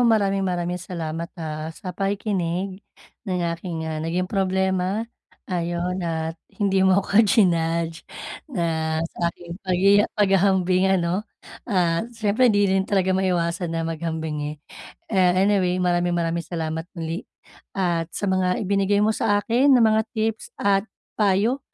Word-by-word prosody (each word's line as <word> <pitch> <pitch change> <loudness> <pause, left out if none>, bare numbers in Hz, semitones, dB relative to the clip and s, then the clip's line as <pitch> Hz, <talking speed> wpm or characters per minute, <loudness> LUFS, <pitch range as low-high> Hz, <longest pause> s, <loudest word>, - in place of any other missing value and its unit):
maraming 200 -4 +2
maraming 180 -1 -1
salamat 170 -2 -5
ah 155 0 -4
sa 180 0 -8
pakikinig, 195 -1 -2 0.4
ng 185 -3 -2
aking, 165 -2 -5
ah, 155 - -3
naging 180 +3 -1
problema. 190 +2 0 0.4
Ayon, 175 +1 -1
at 160 0 -3 0.2
hindi 195 -2 +2
mo 190 +1 +4
ako 200 +3 +1
jinudge 170 -5 +1 0.4
na, 160 - -1
saking 170 +1 -4
pagyaya 195 +3 +4
paghahambing, 190 -2 +3
ano. 190 +2 +1 0.4
At 185 +2 0
siyempre 225 +3 +2
'di 205 -3 +3
rin 190 0 +1
talaga 190 -2 +1
maiwasan 175 -2 0
na 165 - -1
maghambing, 160 -1 -3 0.2
eh. - - -22 0.5
Eh, 185 -3 +4
anyway 185 -3 +2
maraming 175 0 +1
maraming 170 0 -1
salamat 160 -1 -3
muli, 165 +2 -4 0.5
at 170 -4 0
sa 200 -2 -1
mga 185 +1 +1
ibinigay 200 +1 +2
mo 215 - +3
sa 205 -2 +1
akin 245 +4 +2
ng 240 - +5
mga 220 0 +4
tips 220 0 -2
at 200 +1 +2 0.3
payo, 210 +6 +2
185 Hz, 135 wpm, -23 LUFS, 170-200 Hz, 0.5 s, ng